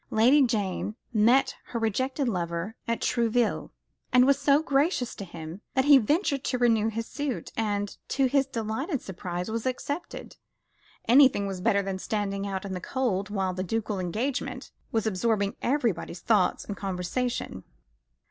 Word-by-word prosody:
Lady 250 +7 +5
Jane 210 -4 0 0.2
met 235 +5 +4
her 235 - -4
rejected 260 +5 0
lover 175 0 -2
at 230 0 -1
Trouville, 235 -1 +1 0.4
and 250 0 +6
was 280 +1 +4
so 285 +2 +4
gracious 280 -3 +1
to - - -7
him 170 +1 -8
that 265 0 +3
he 285 -2 +8
ventured 280 - +1
to 255 - 0
renew 230 -3 +3
his 225 +1 -3
suit, 275 0 -4
and, 205 -2 -1
to 270 - +1
his 270 +1 +2
delighted 260 - -3
surprise, 180 +1 -5
was 230 +2 -2
accepted. 285 +6 -5 0.7
Anything 255 -4 +6
was 190 -2 -4
better 200 +2 +2
than 190 -1 -3
standing 200 -1 -2
out 195 0 -4
in 195 - -4
the 180 - -4
cold 210 -5 -1
while 190 -3 -1
the 185 - -3
ducal 215 +1 -2
engagement 225 +10 -3 0.2
was 225 -3 0
absorbing 205 0 0
everybody's 235 - -1
thoughts 205 -6 +2
and 205 - -5
conversation. 190 - -3
225 Hz, 155 wpm, -27 LUFS, 195-260 Hz, 0.7 s, he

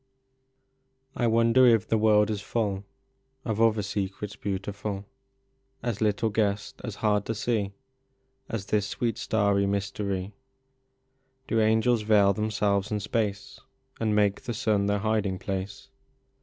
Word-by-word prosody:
I 120 - +1
wonder 115 +3 +5
if 115 -4 +4
the 110 - +2
world 105 -1 +4
is 105 -2 -3
full 100 -2 -2 0.6
Of 110 -2 -1
other 110 -2 +3
secrets 100 +1 -4
beautiful, 100 0 -4 0.8
As 115 -3 -2
little 110 +1 +1
guessed, 105 -1 -1
as - - -5
hard 105 -1 +3
to 115 - -1
see, 105 -3 -1 0.8
As 110 -4 -3
this 105 -1 0
sweet 115 0 -2
starry 100 -2 +1
mystery? 100 0 -2 1.1
Do 115 -1 +2
angels 110 +2 +3
veil 105 -2 +4
themselves 105 -2 0
in 105 - 0
space, 105 -1 -2 0.4
And 110 -2 +1
make 105 -1 +2
the 120 - -4
sun 105 -5 +1
their 100 0 +2
hiding 105 -2 0
place? 100 +7 -5
105 Hz, 130 wpm, -27 LUFS, 100-110 Hz, 1.1 s, wonder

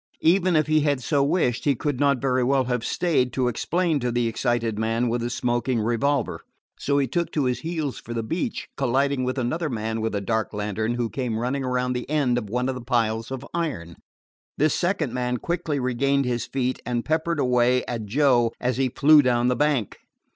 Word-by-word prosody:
Even 180 +1 +3
if 155 -1 +3
he 155 0 +3
had 145 -4 0
so 140 0 +2
wished, 140 -6 +1
he 140 -2 +3
could 140 +1 -2
not 140 -2 +3
very 130 -1 +1
well 135 +1 +2
have 125 -2 -2
stayed 140 -8 +1
to 130 -2 +1
explain 165 +6 0
to 125 -1 -1
the 120 0 +1
excited 115 -2 -1
man 115 +2 0
with 120 +1 -1
the 120 - -2
smoking 120 0 0
revolver. 120 -3 0 0.4
So 140 0 0
he 140 - +3
took 170 +7 -2
to 150 - +1
his 125 -1 0
heels 160 -4 -3
for - - -11
the 115 - -1
beach, 175 - -3
colliding 135 0 +1
with 130 +1 -2
another 155 +6 -1
man 110 -2 -3
with 110 -1 -2
a - - 0
dark 110 +2 -1
lantern 105 +3 -2
who 120 -1 -1
came 125 -5 -2
running 130 +4 -1
around 125 0 0
the 125 +1 -5
end 135 -5 +2
of 105 -4 -8
one 125 +3 -1
of 135 - 0
the 125 - -7
piles 115 -2 0
of 135 0 -6
iron. 140 - -3 0.6
This 155 +2 +3
second 175 -8 -1
man 125 0 -1
quickly 165 -1 -2
regained 135 +2 +1
his 120 -1 -2
feet, 130 -1 -1
and 120 0 -2
peppered 160 +1 0
away 125 -1 +2
at 115 -3 -4
Joe 120 -1 +3
as 125 -1 -1
he 130 -1 +1
flew 150 +4 +6
down 125 -2 +2
the 125 - +1
bank. 145 -8 0
125 Hz, 210 wpm, -24 LUFS, 120-145 Hz, 0.6 s, flew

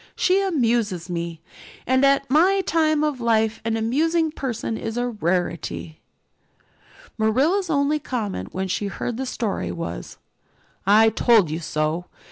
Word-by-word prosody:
"She 380 +2 +3
amuses 230 - 0
me, 170 -2 -4 0.4
and 260 +1 +2
at 275 0 +3
my 360 +8 +4
time 310 -4 +1
of 295 -5 -1
life 225 -1 +1
an 225 0 -1
amusing 315 +8 +1
person 245 -6 -3
is 225 +1 -5
a 245 0 0
rarity." 175 -5 -3 1.2
Marilla's 290 - +2
only 290 0 +1
comment 210 - -4
when 190 +1 -3
she 200 +2 -2
heard 225 +4 -4
the 265 0 -3
story 205 - -2
was, 85 -7 -6 0.7
"I 220 +2 +6
told 220 -7 +3
you 160 - -2
so." 155 +1 -2
230 Hz, 135 wpm, -23 LUFS, 185-280 Hz, 1.2 s, I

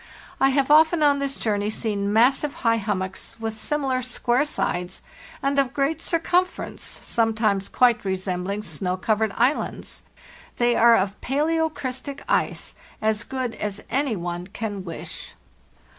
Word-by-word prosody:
I 270 - +5
have 275 +1 +2
often 315 +1 +6
on 285 -1 +4
this 275 -1 -1
journey 210 -2 0
seen 205 -2 -1
massive 265 +6 +3
high 230 0 +4
hummocks 195 -3 -3
with 225 -1 -3
similar 265 +2 -1
square 250 +2 +1
sides, 180 -10 -2 0.4
and 280 0 +2
of 270 -1 0
great 285 +3 0
circumference, 360 +2 0 0.2
sometimes 220 -4 +1
quite 245 -2 +3
resembling 190 +1 -2
snow 185 -3 -2
covered 215 +2 +1
islands. 255 +6 0 0.6
They 240 0 +3
are 235 0 +7
of 195 +1 -2
'palaeocrystic 285 -2 -1
ice,' - - 0 0.3
as 215 0 0
good 255 -3 -3
as 205 0 -4
any 265 -2 +1
one 175 0 -4
can 205 -1 -5
wish. 170 -3 -7
230 Hz, 135 wpm, -24 LUFS, 205-275 Hz, 0.6 s, are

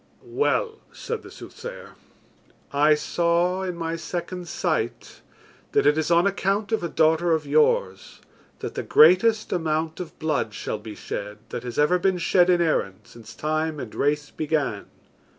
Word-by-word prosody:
"Well," 440 +4 -1
said 465 - -5
the - - -12
soothsayer, - - -10 0.8
"I 150 +2 +5
saw 175 +4 0
in 185 -2 -3
my 165 0 -3
second 175 +1 -5
sight - - -3 0.5
that - - +3
it 145 +1 +5
is 160 0 -1
on 170 +1 +4
account 200 +2 0
of 220 - 0
a 170 - -2
daughter 160 +2 +3
of 155 -2 0
yours 140 -10 +1 0.4
that - - -5
the - - -3
greatest 200 +7 +4
amount 160 -1 -1
of 180 -3 -7
blood 150 -9 -1
shall 105 - -4
be 105 0 -9
shed 105 +1 -6
that - - -5
has 120 -1 -7
ever 165 +5 +3
been 190 0 +1
shed 175 +1 +3
in 175 -1 +4
Erin 110 - 0
since 115 0 -14
time 155 +1 -2
and 120 -5 -7
race 145 +1 0
began. 150 -9 -2
160 Hz, 160 wpm, -24 LUFS, 150-180 Hz, 0.8 s, I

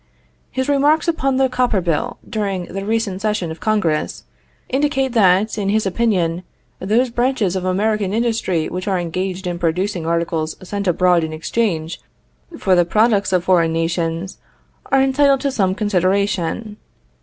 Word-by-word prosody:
His 260 +1 -2
remarks 290 +3 +3
upon 275 -5 +1
the 265 0 +3
copper 250 -5 +1
bill, 180 +8 -1
during 200 -5 -2
the 195 +2 -6
recent 210 -3 -1
session 210 -6 -1
of 160 - -8
Congress, 190 -8 -1 0.4
indicate 270 -1 0
that, 210 -1 +3
in 200 -1 -1
his 215 +1 +1
opinion, 185 -5 0 0.4
those 230 +6 +1
branches 240 -6 0
of 185 -1 -2
American 200 +1 0
industry 220 -7 0
which 185 +3 -5
are 195 -2 +1
engaged 185 +2 -3
in 175 -1 -3
producing 175 +1 -1
articles 165 -1 -1
sent 200 0 -3
abroad 180 -1 +3
in 160 0 -4
exchange 165 -1 -2 0.6
for 190 - +1
the 175 -1 +5
products 210 +2 +2
of 180 -2 +2
foreign 170 -3 +3
nations, 165 +2 -2 0.5
are 270 0 +4
entitled 275 0 +3
to 280 - 0
some 190 -7 +1
consideration. 200 +1 0
195 Hz, 150 wpm, -19 LUFS, 175-230 Hz, 0.6 s, the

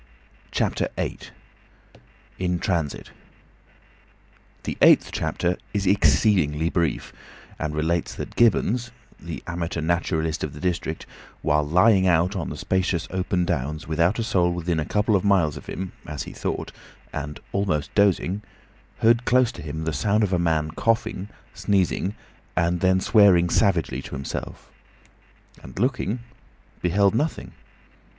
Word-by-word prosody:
CHAPTER - - 0
VIII. - - -2 1.2
IN 90 -1 0
TRANSIT 85 -5 -2 1.5
The - - -3
eighth - - +6
chapter 90 0 -1 0.2
is 100 -1 0
exceedingly 90 -5 +3
brief, 85 -3 -1 0.5
and 75 0 -3
relates 80 +2 -1
that - - -7
Gibbons, 120 +1 +2 0.3
the - - -7
amateur 85 -1 -3
naturalist 80 -1 -1
of 75 - -3
the 75 - -10
district, 85 -2 -2 0.4
while 75 0 +3
lying 95 +5 +4
out 90 +2 +2
on 90 -6 -3
the - - -6
spacious 95 -3 0
open 90 -1 0
downs 75 -2 -2
without 85 +6 +2
a 115 - -1
soul 90 -6 +2
within 85 -1 -1
a 75 - -1
couple 105 +4 +1
of 95 - +1
miles 95 -8 +3
of - - -10
him, 95 -1 -5 0.2
as 75 -2 -4
he - - -9
thought, - - -4 0.4
and 75 -1 -5
almost 95 -7 -1
dozing, 100 -1 +2 0.6
heard 115 +1 +4
close 125 -1 +3
to - - -10
him 80 +1 -5
the 80 0 -2
sound 105 +9 +1
as 100 - +1
of - - -3
a 90 - +2
man 80 -2 +1
coughing, 110 0 -1 0.2
sneezing, 100 0 0 0.4
and 85 0 +2
then 95 +1 +3
swearing 95 -4 +5
savagely 85 - +1
to - - -8
himself; 70 0 -6 0.9
and - - -12
looking, 120 0 0 0.6
beheld 100 +3 +3
nothing. 150 +8 -2
90 Hz, 140 wpm, -24 LUFS, 80-100 Hz, 1.5 s, eighth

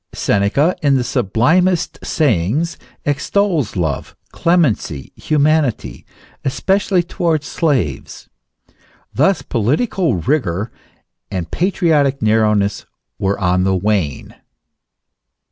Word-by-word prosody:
Seneca, 110 - +1
in 140 -3 +3
the 130 - +1
sublimest 135 - +1
sayings, 140 - 0 0.3
extols 160 - 0
love, 80 -7 -2 0.2
clemency, 135 - 0
humanity, 150 -4 0 0.4
especially 190 +6 +1
towards 165 -3 -1
slaves. 125 - -2 0.9
Thus 160 +6 +2
political 145 - 0
rigour 100 - -1 0.6
and 90 -3 -4
patriotic 160 -7 +1
narrowness 105 -2 +1 0.3
were 95 +1 0
on 90 -1 +1
the 95 0 +1
wane. 95 -7 -1
135 Hz, 85 wpm, -17 LUFS, 100-165 Hz, 0.9 s, in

